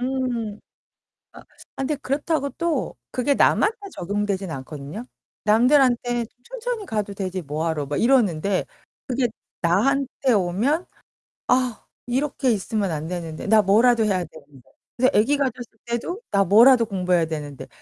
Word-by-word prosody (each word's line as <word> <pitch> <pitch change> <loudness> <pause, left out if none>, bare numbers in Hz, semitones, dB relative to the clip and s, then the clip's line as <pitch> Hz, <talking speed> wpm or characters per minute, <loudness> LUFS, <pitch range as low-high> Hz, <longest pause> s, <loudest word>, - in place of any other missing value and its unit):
음. 245 -5 -2 0.7
아 - - -12
아 - - -19 0.4
근데 295 +2 -1
그렇다고 280 +1 -1
또 335 -4 -2 0.2
그게 255 +3 +1
남한테 435 - +3 0.2
적용되진 200 0 -2
않거든요. 145 - -7 0.4
남들한테 240 +1 +3 0.2
"천천히 - - -5
가도 210 -2 -2
되지 185 -2 -4
뭐하러." 155 0 -2
막 145 +1 -2
이러는데 200 -7 +2 0.4
그게 255 0 +1 0.3
나한테 265 +9 +1
오면 215 - +1 0.6
'아 250 -2 +1 0.2
이렇게 260 0 0
있으면 205 -1 -1
안되는데 160 +2 -5
나 220 0 +6
뭐라도 225 +4 +4
해야 190 -4 +1
되는데.' 145 -5 -17 0.3
근데 255 +1 +3
애기 255 +8 +3
가졌을 250 -4 -3
때도 240 - -3
'나 200 -1 +3
뭐라도 230 +5 +6
공부해야 180 -4 +1
되는데. 150 -3 -6
225 Hz, 300 characters per minute, -23 LUFS, 180-260 Hz, 0.7 s, 나